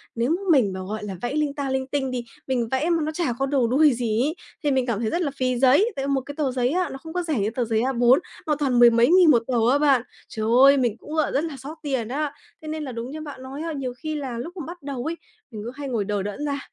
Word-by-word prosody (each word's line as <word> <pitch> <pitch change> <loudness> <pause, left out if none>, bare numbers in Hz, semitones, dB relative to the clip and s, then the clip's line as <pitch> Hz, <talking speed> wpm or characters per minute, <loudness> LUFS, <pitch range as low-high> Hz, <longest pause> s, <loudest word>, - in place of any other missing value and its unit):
nếu 235 +2 0
m 370 +2 +1
mình 240 - +4
mà, 190 - -5
gọi 210 +3 -5
là, 200 -2 -5
vẽ 245 +2 -2
linh 300 -2 0
ta 280 -2 -3
linh 265 0 -1
tinh 270 -1 -2
đi, 250 -1 -3 0.2
mình 250 -3 0
vẽ 265 +6 +1
mà 340 - +3
nó 310 - -2
chả 315 -6 -1
có 270 - +2
đầu 270 -3 +1
đuôi 285 +4 +4
gì 230 -2 0
ấy, 305 +4 -1 0.3
thì 290 - +2
mình 260 -2 +2
cảm 235 -5 -1
thấy 220 - 0
rất 345 - -1
là 295 -5 -1
phí 255 -2 0
giấy, 275 - +4
tại 275 0 -3
một 275 -1 +1
cái 285 +2 -9
tờ 285 -4 0
giấy 250 -1 +1
á 365 +2 0
nó 270 - -7
không 320 +4 -10
có 360 0 -1
rẻ 310 -8 -1
như 200 +1 +1
tờ 245 - 0
giấy 220 -1 +1
A4, 250 +1 +4 0.3
mà 305 - +2
toàn 260 -4 +2
mười 240 0 +9
mấy 235 +1 +4
nghìn 355 -2 +7
một 235 -4 +4
tờ 260 - -2 0.2
á 280 - +4
bạn. 285 -4 +4 0.3
Trời 215 -1 -4 0.2
ơi! 275 +1 +7
Mình 240 -4 0
cũng 300 - -10
gọi 310 -2 +1
rất 275 - +1
là 315 -4 -5
xót 285 +5 -9
tiền 265 -6 -1
á, 285 +4 -2 0.3
thế 310 - -10
nên 310 0 -3
là 270 - -5
đúng 235 +2 -6
như 310 +1 -6
bạn 290 -4 -8
nói 270 +3 -7
á, 330 0 -3
nhiều 265 -4 -4
khi 310 +2 -4
là 265 -5 -4
lúc 335 +11 -7
mà 330 - -5
bắt 345 -1 -9
đầu 275 -3 -5
ấy, 325 +1 -2 0.4
mình 215 -2 -7
cứ 240 - -4
hay 285 0 -6
ngồi 225 -5 -1
đờ 205 -1 -1
đẫn 205 +9 -4
ra, 285 -1 -2
270 Hz, 310 wpm, -24 LUFS, 240-300 Hz, 0.4 s, mười